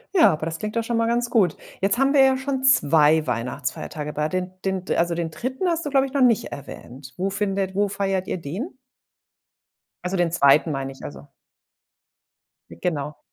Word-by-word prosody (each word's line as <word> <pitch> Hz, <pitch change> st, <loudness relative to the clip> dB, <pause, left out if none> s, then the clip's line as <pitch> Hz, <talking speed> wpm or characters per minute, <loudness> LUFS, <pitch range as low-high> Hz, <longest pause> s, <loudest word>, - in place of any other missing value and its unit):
Ja, 330 Hz, -, +7 dB
aber 155 Hz, +1 st, -3 dB
das 165 Hz, 0 st, -4 dB
klingt 215 Hz, +5 st, -5 dB
doch 230 Hz, -, +1 dB
schon 230 Hz, 0 st, -1 dB
mal 230 Hz, -, +2 dB
ganz 240 Hz, 0 st, 0 dB
gut. 190 Hz, -8 st, +3 dB, 0.3 s
Jetzt 200 Hz, +4 st, +2 dB
haben 270 Hz, +1 st, +3 dB
wir 275 Hz, -, +6 dB
ja 265 Hz, 0 st, +4 dB
schon 265 Hz, 0 st, -3 dB
2 155 Hz, -, +4 dB
Weihnachtsfeiertage 125 Hz, +5 st, -4 dB
bei 150 Hz, +1 st, -1 dB
den 185 Hz, +1 st, -3 dB
den 190 Hz, -1 st, -1 dB
also, 170 Hz, 0 st, +1 dB
den 165 Hz, -1 st, -2 dB
3. 260 Hz, -, -3 dB
hast 335 Hz, -2 st, 0 dB
du, 290 Hz, -, -3 dB
glaube 270 Hz, -1 st, +3 dB
ich, 265 Hz, -, -13 dB
noch 280 Hz, -, +1 dB
nicht 240 Hz, -4 st, +4 dB
erwähnt. 135 Hz, -1 st, -10 dB
Wo 190 Hz, +2 st, -1 dB
findet 195 Hz, -1 st, -2 dB
wo 205 Hz, 0 st, +2 dB
feiert 195 Hz, -1 st, -2 dB
ihr -, -, -2 dB
den? 190 Hz, -, -4 dB, 1.3 s
Also, 180 Hz, +2 st, -2 dB
den 175 Hz, -2 st, +1 dB
2., 150 Hz, 0 st, +4 dB
meine 135 Hz, -1 st, -3 dB
ich, -, -, -16 dB
also 70 Hz, 0 st, -9 dB, 1.4 s
Ah, -, -, -9 dB
genau. 150 Hz, -4 st, -3 dB
185 Hz, 195 wpm, -23 LUFS, 150-235 Hz, 1.4 s, Ja